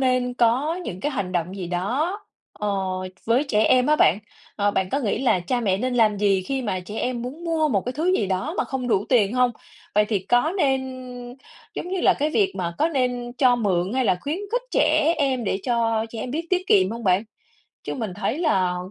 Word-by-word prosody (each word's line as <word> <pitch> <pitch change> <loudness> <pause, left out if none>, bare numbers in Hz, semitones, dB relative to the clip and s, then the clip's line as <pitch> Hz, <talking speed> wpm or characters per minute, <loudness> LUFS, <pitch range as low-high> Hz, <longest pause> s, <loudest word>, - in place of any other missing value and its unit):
nên 255 -1 +1
có 255 +8 +2
những 180 - -6
cái 295 +6 -2
hành 195 -7 -3
động 180 +2 -2
gì 185 - -4
đó, 250 - -1 0.3
ờ, 210 - -4 0.6
với 240 +5 +3
trẻ 215 -3 +3
em 255 -1 +4
á 305 0 +4
bạn, 195 - +4 0.4
ờ, 205 0 +2
bạn 190 -2 -1
có 275 - +1
nghĩ 215 -7 -1
là 215 -8 +3
cha 240 +7 -1
mẹ 195 -4 +1
nên 255 +2 -1
làm 220 -3 +3
gì 195 -2 +2
khi 265 +5 -3
mà 190 -5 -2
trẻ 205 +4 -7
em 245 -2 -2
muốn 280 +8 -7
mua 320 -2 +1
một 205 -7 +1
cái 250 - -3
thứ 330 +7 0
gì 200 - 0
đó 195 - -2
mà - - +2
không 260 -3 -4
đủ 205 -3 +2
tiền 225 -4 +3
hông? 250 -1 +3 0.4
Vậy 210 +1 +4
thì 210 -2 0
có 245 - +1
nên 270 -5 +2 0.9
giống - - -5
như 375 0 -2
là, - - +4
cái 300 +1 -1
việc 385 +3 +2
mà 170 -1 -3
có 315 - +3
nên 250 -5 -1
cho 250 -2 +5
mượn 190 -3 0
hay 260 -1 +1
là 180 -4 +2
khuyến 300 +5 -3
khích - - +1
trẻ 310 +1 +3
em 265 -4 0
để 190 - 0
cho 230 -2 0
trẻ 225 - -6
em 250 - -4
biết 325 +5 -3
tiết 370 0 +1
kiệm 190 - +4
hông 230 -1 -6
bạn? 185 +3 +3 0.6
Chứ - - -4
mình 220 -8 -4
thấy 225 +7 -2
là 190 - +1
245 Hz, 230 wpm, -23 LUFS, 200-280 Hz, 0.9 s, cho